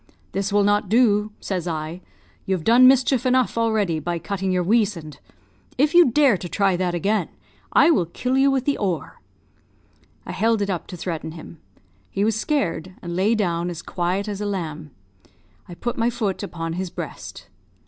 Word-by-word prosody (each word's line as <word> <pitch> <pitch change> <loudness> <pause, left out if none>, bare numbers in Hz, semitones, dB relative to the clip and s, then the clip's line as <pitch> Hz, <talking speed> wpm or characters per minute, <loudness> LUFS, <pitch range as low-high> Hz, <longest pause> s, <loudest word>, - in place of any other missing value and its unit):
'This 195 +1 -2
will 205 0 +3
not 205 -1 +1
do,' 215 -2 +3
says 180 -3 -3
I; 160 +2 -4 0.5
'you've 190 -4 -1
done 245 +5 +6
mischief 260 -1 +4
enough 255 -1 +2
already 215 -8 +1
by 170 +3 -3
cutting 195 +2 -3
your 180 -1 +1
weasand! 185 - 0 0.6
If 290 +4 +2
you 345 -5 +7
dare 265 -4 +4
to 175 - -7
try 195 0 +1
that 175 -1 -1
again, 205 +5 0 0.4
I 335 - +5
will 180 - +2
kill 250 +9 -2
you 270 +1 +4
with 265 -2 0
the 285 - 0
oar.' 180 -8 -3 1.0
I - - -6
held 225 0 +1
it 200 - -2
up 175 - -4
to 180 - -8
threaten 165 -2 -5
him; 160 0 -11 0.5
he 200 - -1
was 220 -1 +1
scared, 185 - -2
and 170 -1 -5
lay 200 +5 +2
down 175 -4 -1
as 170 -2 -7
quiet 185 +3 -2
as 205 -1 -4
a 205 - -2
lamb. 160 -6 -4 0.8
I 175 - -8
put 240 +6 -4
my 230 +1 +2
foot 220 -5 -2
upon 165 -4 -5
his 185 +1 -3
breast. - - -8
200 Hz, 180 wpm, -22 LUFS, 175-230 Hz, 1.0 s, you